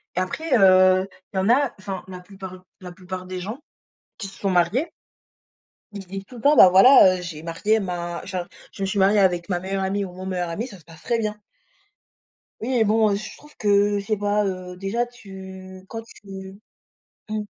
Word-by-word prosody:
et -, -, 0 dB
après, 310 Hz, -, -3 dB
heu, 185 Hz, -1 st, +5 dB, 0.3 s
il -, -, -3 dB
y -, -, +3 dB
en 190 Hz, +3 st, +1 dB
a 260 Hz, +1 st, +3 dB
enfin, 190 Hz, -1 st, -6 dB
la 185 Hz, -1 st, -8 dB
plupart 185 Hz, 0 st, -11 dB, 0.2 s
la 180 Hz, -1 st, -8 dB
plupart 185 Hz, 0 st, -8 dB
des 185 Hz, 0 st, -6 dB
gens 215 Hz, +8 st, -6 dB, 0.6 s
qui 200 Hz, -, -5 dB
se 195 Hz, -, -14 dB
sont 195 Hz, -, -1 dB
mariés 190 Hz, -, +1 dB, 1.0 s
ils 200 Hz, -, -6 dB
se -, -, -23 dB
disent 195 Hz, +1 st, -7 dB
tout 250 Hz, -, -14 dB
le 235 Hz, -, -9 dB
temps, 290 Hz, +4 st, +5 dB
bah, 185 Hz, -, +9 dB
voilà, 190 Hz, 0 st, +7 dB
heu, -, -, -7 dB
j'ai 165 Hz, -3 st, -7 dB
marié 185 Hz, +7 st, 0 dB
ma 175 Hz, -3 st, -4 dB
genre 180 Hz, -2 st, -4 dB, 0.2 s
je -, -, -11 dB
me -, -, +1 dB
suis 195 Hz, +2 st, -3 dB
mariée 200 Hz, +2 st, +4 dB
avec 180 Hz, -2 st, +2 dB
ma 175 Hz, -2 st, 0 dB
meilleure 190 Hz, +1 st, -3 dB
amie 200 Hz, +1 st, -1 dB
ou 185 Hz, -, -9 dB
mon 185 Hz, +1 st, -8 dB
meilleur 180 Hz, -2 st, -2 dB
ami, 200 Hz, +8 st, -3 dB
ça 205 Hz, -6 st, -11 dB
se 160 Hz, -, -21 dB
passe 165 Hz, -1 st, -15 dB
très 235 Hz, -1 st, 0 dB
bien. 210 Hz, -1 st, -3 dB, 1.2 s
Oui 230 Hz, -, -3 dB
et 225 Hz, -, +4 dB
bon, 215 Hz, +1 st, +3 dB
heu, -, -, +1 dB
je 215 Hz, +2 st, -8 dB
trouve 295 Hz, 0 st, -17 dB
que 205 Hz, 0 st, +2 dB
je 200 Hz, -, -7 dB
sais 215 Hz, -, 0 dB
pas, 205 Hz, +1 st, +1 dB
heu, 185 Hz, -1 st, -5 dB
déjà 200 Hz, +6 st, -1 dB
tu 190 Hz, -5 st, -11 dB
quand 225 Hz, -, -5 dB
tu 195 Hz, -3 st, -11 dB, 0.7 s
mmh. 215 Hz, 0 st, -2 dB
190 Hz, 220 wpm, -23 LUFS, 185-210 Hz, 1.2 s, bah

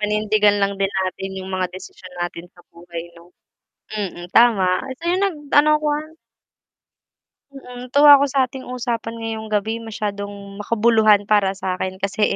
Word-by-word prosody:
Panindigan 210 Hz, 0 st, +2 dB
lang 200 Hz, 0 st, +1 dB
din 195 Hz, -, +2 dB
natin 190 Hz, 0 st, -3 dB
yung 190 Hz, 0 st, -7 dB
mga 185 Hz, -1 st, -1 dB
desisyon 185 Hz, -1 st, -11 dB
natin 175 Hz, 0 st, -5 dB
sa 175 Hz, -, -18 dB
buhay, 170 Hz, 0 st, -9 dB
'no. 170 Hz, +1 st, -18 dB, 0.6 s
Mm, 180 Hz, -4 st, -5 dB
tama 195 Hz, -6 st, +4 dB, 0.2 s
so -, -, -26 dB
'yun 365 Hz, +2 st, +1 dB
nag-ano 300 Hz, -4 st, +2 dB
ko, 305 Hz, -, -4 dB
ah. 310 Hz, +2 st, -5 dB, 1.4 s
Mm, 250 Hz, -2 st, -10 dB
tuwa 290 Hz, +1 st, +7 dB
ako 280 Hz, -, +2 dB
sa 275 Hz, -, 0 dB
atin 260 Hz, +1 st, -10 dB
usapan 235 Hz, -2 st, -3 dB
ngayong 220 Hz, -1 st, -5 dB
gabi 215 Hz, +2 st, 0 dB
masyadong 205 Hz, -2 st, -5 dB, 0.3 s
makabuluhan 215 Hz, -1 st, +3 dB
para 205 Hz, -2 st, +4 dB
sa'kin 185 Hz, 0 st, -4 dB
kasi, 200 Hz, +2 st, -3 dB
210 Hz, 150 wpm, -20 LUFS, 190-245 Hz, 1.4 s, tuwa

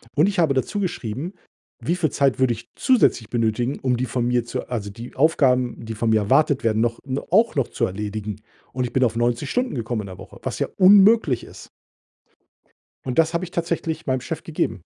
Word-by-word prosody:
Und 150 Hz, +6 st, +4 dB
ich 200 Hz, -2 st, -2 dB
habe 160 Hz, -5 st, +3 dB
dazu 135 Hz, +10 st, -1 dB
geschrieben: 160 Hz, -, -4 dB, 0.5 s
Wie 170 Hz, -, 0 dB
viel 170 Hz, -4 st, 0 dB
Zeit 135 Hz, -2 st, +1 dB
würde 130 Hz, -2 st, +3 dB
ich 120 Hz, +1 st, -11 dB
zusätzlich 220 Hz, -, +2 dB
benötigen, 120 Hz, +2 st, -1 dB
um 125 Hz, -3 st, +1 dB
die 130 Hz, -, -1 dB
von 120 Hz, 0 st, -2 dB
mir 120 Hz, -1 st, +1 dB
zu -, -, -5 dB
also, 110 Hz, -5 st, -3 dB
die 115 Hz, +4 st, -10 dB
Aufgaben, 130 Hz, -5 st, +2 dB
die 110 Hz, -, -5 dB
von 115 Hz, +1 st, 0 dB
mir 110 Hz, -1 st, +3 dB
erwartet 135 Hz, +6 st, +2 dB
werden, 110 Hz, -1 st, +1 dB
noch 115 Hz, 0 st, 0 dB
no 135 Hz, 0 st, -4 dB
auch 225 Hz, +5 st, +4 dB
noch 135 Hz, -4 st, +1 dB
zu -, -, -1 dB
erledigen. 105 Hz, +1 st, -4 dB, 0.4 s
Und 125 Hz, 0 st, -1 dB
ich 120 Hz, -, -7 dB
bin 130 Hz, -, +2 dB
auf 115 Hz, -3 st, +1 dB
90 120 Hz, 0 st, 0 dB
Stunden 250 Hz, -, -1 dB
gekommen 115 Hz, -2 st, -2 dB
in -, -, -8 dB
der 95 Hz, -1 st, -9 dB
Woche, -, -, -12 dB
was -, -, -3 dB
ja -, -, 0 dB
unmöglich 195 Hz, -, +6 dB
ist. -, -, -12 dB, 1.4 s
Und 130 Hz, +3 st, -1 dB
das 165 Hz, 0 st, +3 dB
habe 170 Hz, +2 st, -1 dB
ich 175 Hz, -, -12 dB
tatsächlich 165 Hz, -2 st, -2 dB
meinem 130 Hz, -2 st, 0 dB
Chef -, -, -5 dB
gegeben. -, -, -2 dB
130 Hz, 210 wpm, -22 LUFS, 115-160 Hz, 1.4 s, unmöglich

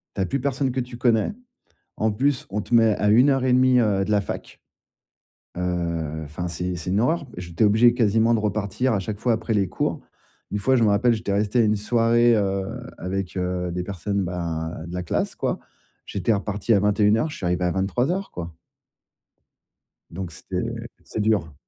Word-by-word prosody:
Tu -, -, -1 dB
as -, -, +2 dB
plus 140 Hz, +10 st, -1 dB
personne 135 Hz, 0 st, 0 dB
que 130 Hz, -, -2 dB
tu 120 Hz, -1 st, -5 dB
connais, 120 Hz, -, +2 dB, 0.6 s
en 110 Hz, -, +1 dB
plus, 130 Hz, +5 st, 0 dB
on 105 Hz, -, -1 dB
te 115 Hz, -, -3 dB
met 115 Hz, -2 st, +5 dB
à 105 Hz, -, +1 dB
1 125 Hz, +6 st, +6 dB
heure 135 Hz, -2 st, +1 dB
et 130 Hz, -, +3 dB
demie, 130 Hz, 0 st, +5 dB
heu, 100 Hz, -5 st, +2 dB
de 105 Hz, -, -4 dB
la 105 Hz, -1 st, +3 dB
fac, 100 Hz, -, -7 dB, 1.0 s
heu, 85 Hz, -3 st, -2 dB
enfin, 80 Hz, +5 st, -5 dB
c'est 90 Hz, +1 st, -3 dB
c'est 85 Hz, +1 st, -5 dB
une 95 Hz, +3 st, +2 dB
horreur. 145 Hz, +5 st, +1 dB
J'étais 85 Hz, +3 st, -2 dB
obligé, 110 Hz, +3 st, +5 dB
quasiment, 115 Hz, 0 st, +3 dB
de 115 Hz, -, +2 dB
repartir 105 Hz, +4 st, 0 dB
à 100 Hz, -, +1 dB
chaque 100 Hz, +2 st, -5 dB
fois 120 Hz, 0 st, +2 dB
après 110 Hz, +1 st, -2 dB
les 100 Hz, -4 st, +1 dB
cours. -, -, -2 dB, 0.5 s
Une 105 Hz, -, -2 dB
fois, 130 Hz, +6 st, +2 dB
je 120 Hz, -, +3 dB
me 110 Hz, -, +4 dB
rappelle, 115 Hz, +4 st, +3 dB
j'étais 105 Hz, -3 st, -2 dB
resté 105 Hz, +4 st, +1 dB
à -, -, +5 dB
une 105 Hz, 0 st, +3 dB
soirée, 115 Hz, +2 st, +3 dB
heu, 100 Hz, -2 st, 0 dB, 0.3 s
avec, 95 Hz, +1 st, -4 dB
heu, 90 Hz, -1 st, -2 dB
des 90 Hz, +1 st, -3 dB
personnes, 100 Hz, +1 st, -2 dB
ben, 85 Hz, -3 st, -3 dB, 0.2 s
de 85 Hz, -, -8 dB
la 90 Hz, 0 st, -3 dB
classe, 90 Hz, -, -2 dB
quoi. -, -, -2 dB, 0.5 s
J'étais 100 Hz, +3 st, 0 dB
reparti 105 Hz, +2 st, 0 dB
à 100 Hz, -, +5 dB
21:00. 105 Hz, +6 st, +2 dB
Je 150 Hz, -, -7 dB
suis -, -, -5 dB
arrivé 90 Hz, +1 st, 0 dB
à 90 Hz, -, +1 dB
23:00 125 Hz, -, -1 dB
quoi. 85 Hz, -1 st, -6 dB, 1.6 s
Donc, 90 Hz, +1 st, -6 dB
c'était -, -, -4 dB, 0.4 s
c'est -, -, -6 dB
dur. 105 Hz, -8 st, +1 dB
105 Hz, 200 wpm, -24 LUFS, 90-120 Hz, 1.6 s, 1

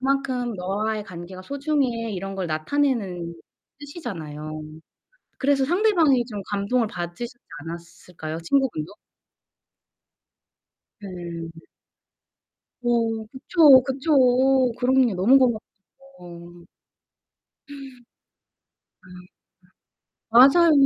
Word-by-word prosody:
'그만큼 260 Hz, -3 st, -1 dB
너와의 205 Hz, +3 st, -2 dB
관계가 180 Hz, +1 st, -9 dB
소중해.' 270 Hz, -4 st, -2 dB
이런 195 Hz, 0 st, -5 dB
걸 190 Hz, -2 st, -3 dB
나타내는 180 Hz, -, -1 dB, 0.4 s
뜻이잖아요. 155 Hz, -, -7 dB, 0.8 s
그래서 275 Hz, 0 st, +2 dB
상대방이 335 Hz, -, +3 dB
좀 210 Hz, -4 st, -6 dB
감동을 205 Hz, +4 st, 0 dB
받으셨지 180 Hz, +7 st, -6 dB, 0.3 s
않았을까요 170 Hz, -1 st, -8 dB
친구분도? 180 Hz, -, -1 dB, 2.2 s
네. 170 Hz, -2 st, -7 dB, 1.3 s
어 230 Hz, -2 st, 0 dB
그쵸, 275 Hz, 0 st, +5 dB
그쵸. 265 Hz, -2 st, +3 dB
그럼요. 255 Hz, -3 st, +3 dB
너무 210 Hz, +10 st, +5 dB, 0.5 s
고맙죠. 175 Hz, -10 st, -14 dB, 1.0 s
음 280 Hz, -1 st, -9 dB, 1.2 s
네. 180 Hz, -1 st, -14 dB, 1.0 s
맞아요. 275 Hz, +9 st, +7 dB
230 Hz, 195 characters per minute, -23 LUFS, 180-270 Hz, 2.2 s, 맞아요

